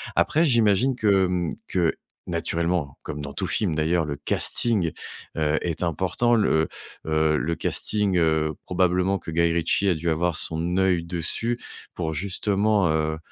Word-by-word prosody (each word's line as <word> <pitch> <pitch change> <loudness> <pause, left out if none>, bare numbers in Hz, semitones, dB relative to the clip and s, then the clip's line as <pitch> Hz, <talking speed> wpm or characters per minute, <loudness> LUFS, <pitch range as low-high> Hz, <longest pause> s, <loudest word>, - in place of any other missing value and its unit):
Après 160 - +3
j'imagine 120 - +3
que, 100 -5 +3
hem, 90 -2 -1
que 85 -3 +1 0.3
naturellement, 85 -3 -2
comme 75 -1 -6
dans 70 -1 -7
tout - - -3
film 90 -7 +1
d'ailleurs 80 +1 +1
le 70 - -3
casting, 85 +5 +1 0.5
heu, 75 0 +1
est 85 0 -3
important. 95 +8 0
Le, 80 -8 +2 0.4
heu, 80 0 +2
le 85 +2 -1
casting, 100 0 0
heu, 80 -2 +2
probablement 90 +1 +1
que - - -9
Guy 85 +1 +2
Ritchie 85 +4 +1
a - - +4
dû 85 +1 -2
avoir 85 +1 0
son 85 +4 -1
œil 90 -3 +2
dessus, 90 +8 -1 0.4
pour 80 -2 -3
justement, 100 +2 +1
heu, 80 0 0
85 Hz, 155 wpm, -24 LUFS, 80-95 Hz, 0.5 s, a